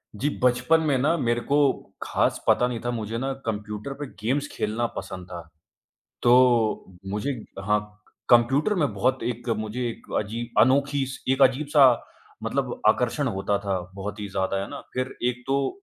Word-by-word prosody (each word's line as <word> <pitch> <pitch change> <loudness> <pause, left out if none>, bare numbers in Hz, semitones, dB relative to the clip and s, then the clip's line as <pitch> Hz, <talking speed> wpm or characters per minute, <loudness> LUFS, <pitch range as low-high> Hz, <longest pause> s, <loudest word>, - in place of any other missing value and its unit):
जी, 140 +8 0
बचपन 125 +6 +3
में 145 -4 +2
ना 150 +6 +2
मेरे 120 -4 0
को 145 +4 +1 0.5
खास - - 0
पता 125 - +4
नहीं 120 -2 -3
था, 120 - 0
मुझे 115 -1 -3
ना 135 +3 -2
कंप्यूटर 105 +3 -4
पे 145 +1 -6
गेम्स 140 +6 0
खेलना 110 +3 -1
पसंद 95 -2 -6
था। 85 -1 -6 0.8
तो 120 -6 +4
मुझे 105 +8 -1 0.3
हाँ, 105 +1 +3 0.5
कंप्यूटर 135 - +4
में 145 - +1
बहुत 130 +6 0
एक 120 0 -3
मुझे 110 +3 -4
एक 115 - -10
अजीब 115 +2 -3
अनोखी 140 +3 +3
स 135 - -7
एक 135 +1 +2
अजीब 135 +2 +4
सा 145 -3 +8 0.6
मतलब - - -2
आकर्षण 130 +4 +2
होता 100 -2 0
था 100 -2 -1 0.2
बहुत 100 +1 -5
ही 105 - -4
ज़्यादा, 95 0 -1
है 100 - -5
ना? - - -7
फिर 130 +1 -2
एक 125 0 -3
तो 135 0 +1
120 Hz, 170 wpm, -25 LUFS, 105-135 Hz, 0.8 s, सा